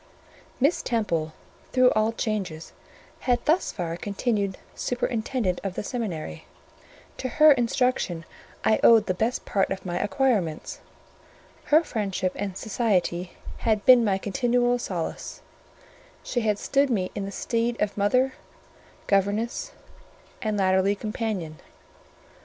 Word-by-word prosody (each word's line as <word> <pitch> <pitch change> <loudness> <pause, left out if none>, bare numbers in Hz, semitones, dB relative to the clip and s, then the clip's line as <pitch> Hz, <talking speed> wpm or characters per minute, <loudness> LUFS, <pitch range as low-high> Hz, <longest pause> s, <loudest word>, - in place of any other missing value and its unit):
Miss 285 +6 +2
Temple, 170 -10 -1 0.4
through 255 -1 +5
all 215 +1 +2
changes, 200 -8 -3 0.5
had 245 -1 0
thus 330 +5 +2
far 170 -3 -4
continued 200 +1 -1 0.2
superintendent 235 -5 -1
of 195 -2 -3
the - - -3
seminary: 185 - -5 0.7
to 255 - -3
her 305 +5 +6
instruction 240 - +1 0.4
I 220 - +4
owed 225 -2 +7
the 185 - 0
best 225 +7 -1
part 195 - +1
of 195 - -4
my 175 -1 -2
acquirements; 205 - 0 0.9
her 310 +3 +5
friendship 195 - -2
and 195 -2 -4
society 185 -5 0 0.2
had 215 -3 0
been 250 -2 +8
my 200 -3 +2
continual 245 +4 +1
solace; 175 -8 -5 0.8
she 245 - -1
had 210 -2 +1
stood 275 +5 +1
me 190 -7 0
in 200 - -4
the 200 - -5
stead 230 +3 -1
of 210 -1 0
mother, 255 +6 +2 0.7
governess, 205 +4 0 0.7
and, 215 -2 -1
latterly, 190 +1 +3
companion. 200 -7 -4
210 Hz, 125 wpm, -25 LUFS, 190-245 Hz, 0.9 s, been